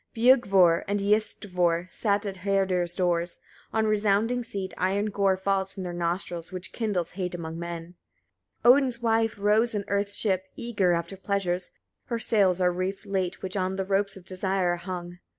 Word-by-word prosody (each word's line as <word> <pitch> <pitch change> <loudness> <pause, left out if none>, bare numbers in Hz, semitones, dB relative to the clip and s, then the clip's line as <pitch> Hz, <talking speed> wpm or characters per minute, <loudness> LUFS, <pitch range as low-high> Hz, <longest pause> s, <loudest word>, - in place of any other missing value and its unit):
Biugvor 195 -8 +5
and 205 +1 0
Iyistvor 185 -4 0
sit 205 -1 0
at 195 -2 -4
Herdir's 185 -2 +1
doors, 175 -2 0 0.3
on 220 0 +1
resounding 215 +3 +2
seat; 195 -4 -5
iron 200 +3 0
gore 195 -1 +2
falls 195 0 0
from 195 - -7
their 175 -1 -4
nostrils, 175 0 -3
which 185 -1 -6
kindles 205 -7 -1
hate 180 -1 -4
among 165 -1 -6
men. 170 0 -6 0.7
77. 240 - +9
Odin's 255 -4 0
wife 225 -1 +2
rows 215 +3 +2
in 200 -1 -2
earth's 200 0 0
ship, 190 -3 +1
eager 205 -7 +1
after 170 +3 -2
pleasures; 185 -2 -2 0.4
her 235 - -2
sails 200 -5 +2
are 180 -1 +3
reefed 190 +3 -3
late, 190 -3 -2
which 190 +1 -4
on 190 -1 -1
the 190 0 -2
ropes 195 0 0
of 180 - -14
desire 190 -1 0
are - - -3
hung. 180 0 -5
78. 175 - -13
Son! - - -36
195 Hz, 180 wpm, -27 LUFS, 180-205 Hz, 0.7 s, 77